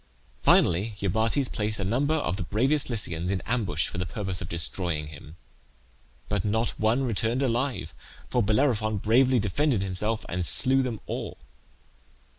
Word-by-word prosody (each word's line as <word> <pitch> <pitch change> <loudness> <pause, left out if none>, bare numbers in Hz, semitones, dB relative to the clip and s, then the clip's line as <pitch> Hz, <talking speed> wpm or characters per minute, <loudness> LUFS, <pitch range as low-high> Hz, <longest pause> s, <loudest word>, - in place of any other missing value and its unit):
Finally, 100 +6 +3
Iobates 110 +7 0
placed 110 0 -1
a - - -2
number 135 +10 0
of 145 - -2
the 95 - -7
bravest 130 - +1
Lycians 90 -7 -1
in 95 -1 0
ambush 100 -10 -1
for - - -6
the 90 - -2
purpose 95 -5 -3
of 85 - -6
destroying 85 -2 +1
him, 75 +1 -12 0.9
but 105 -4 -1
not 110 +3 0
one 110 +5 +1
returned 115 +2 -1
alive, 125 +1 -2 0.3
for 125 - 0
Bellerophon 110 -1 +1
bravely 125 +6 +3
defended 115 +2 0
himself 105 +4 -1
and 90 +1 -3
slew 135 - +5
them 120 -5 -4
all. - - -6
110 Hz, 150 wpm, -26 LUFS, 95-125 Hz, 0.9 s, slew